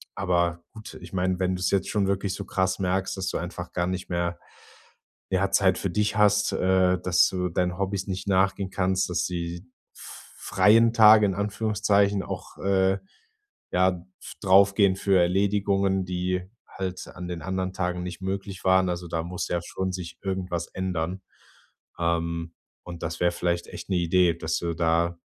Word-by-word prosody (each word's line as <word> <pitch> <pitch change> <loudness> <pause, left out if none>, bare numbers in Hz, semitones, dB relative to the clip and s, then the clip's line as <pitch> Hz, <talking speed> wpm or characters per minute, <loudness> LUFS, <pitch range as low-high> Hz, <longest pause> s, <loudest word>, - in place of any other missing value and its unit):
aber 85 -1 0
gut. 110 -1 -10
Ich - - -11
meine, 90 0 0
wenn 95 0 0
du's 90 - -1
jetzt 95 -1 +1
schon 100 -3 +1
wirklich 100 0 -1
so 100 - -6
krass 95 0 -1
merkst, 95 +1 -1
dass 95 - -3
du - - -2
einfach - - -6
gar 85 +1 0
nicht 95 0 -4
mehr, 85 0 -2 0.9
ja, 95 +1 +1
Zeit 95 -1 +3
für 95 - -2
dich 105 +2 0
hast, 105 0 +3
äh, 90 -1 +2
dass 90 -1 +4
du 90 -1 -2
deinen 90 +1 -1
Hobbys 100 0 -2
nicht 95 +1 -4
nachgehen 95 0 +1
kannst, 95 -1 0
dass 85 -1 0
die 85 0 -4 0.3
f - - -12
freien 110 +5 +4
Tage 110 -1 +7
in 95 - -1
Anführungszeichen 100 -1 +1
auch, - - -7
äh, 95 0 +2 0.7
ja, 90 -1 +1 0.2
f - - -9
draufgehen 100 0 +5
für 95 -2 +2
Erledigungen, 95 +1 +1
die 90 0 -2 0.2
halt 95 -1 -5
an 90 -1 -8
den 90 -1 -5
anderen 95 0 -2
Tagen 90 -1 -2
nicht 90 +1 -7
möglich 95 0 -4
waren. 95 0 +4
Also, 90 0 -4
da 80 -1 -1
muss 90 +1 -4
ja 85 - 0
schon 95 +2 -3
sich 90 -2 -7
irgendwas 95 -3 -3
ändern. 95 0 -3 0.8
Ähm, 85 0 -1 0.3
und 85 -1 -9
das 80 -1 -4
wäre 85 0 +3
vielleicht 85 0 -2
echt - - -9
'ne 95 - +1
Idee, 85 0 +3
dass 80 +1 -2
du 85 -1 -2
da 85 +1 +1
95 Hz, 175 wpm, -26 LUFS, 90-95 Hz, 0.9 s, Tage